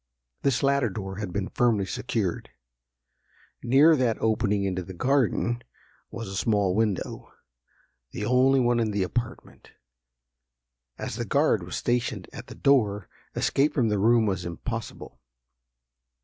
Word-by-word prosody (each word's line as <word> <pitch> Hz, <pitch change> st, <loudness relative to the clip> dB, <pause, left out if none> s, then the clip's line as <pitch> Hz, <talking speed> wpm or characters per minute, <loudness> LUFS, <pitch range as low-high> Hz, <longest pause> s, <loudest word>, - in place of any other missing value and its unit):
This 135 Hz, -1 st, +1 dB
latter 140 Hz, -3 st, +2 dB
door 95 Hz, -1 st, -6 dB
had 100 Hz, -3 st, -4 dB
been 100 Hz, +1 st, -3 dB
firmly 115 Hz, -5 st, +1 dB
secured. 100 Hz, -3 st, -3 dB, 1.1 s
Near 140 Hz, +7 st, +5 dB
that 125 Hz, -5 st, +1 dB
opening 105 Hz, -2 st, +1 dB
into 95 Hz, -1 st, -1 dB
the 95 Hz, +1 st, -9 dB
garden, 120 Hz, 0 st, +1 dB, 0.5 s
was 115 Hz, -1 st, -7 dB
a 95 Hz, -, -6 dB
small 100 Hz, -3 st, +1 dB
window, 105 Hz, -2 st, -2 dB, 0.8 s
the 105 Hz, -, -5 dB
only 130 Hz, +3 st, +4 dB
one 120 Hz, -1 st, +2 dB
in 115 Hz, -2 st, +1 dB
the 100 Hz, -2 st, 0 dB
apartment. 120 Hz, +6 st, -5 dB, 1.2 s
As -, -, -5 dB
the -, -, -2 dB
guard -, -, +2 dB
was -, -, -6 dB
stationed 120 Hz, 0 st, -1 dB
at -, -, -9 dB
the -, -, -10 dB
door, 105 Hz, -9 st, +2 dB, 0.3 s
escape 145 Hz, +2 st, +1 dB
from 120 Hz, -5 st, +2 dB
the 105 Hz, -1 st, 0 dB
room 115 Hz, +2 st, +4 dB
was 95 Hz, -3 st, -1 dB
impossible. 95 Hz, -, -6 dB
110 Hz, 135 wpm, -26 LUFS, 100-125 Hz, 1.2 s, Near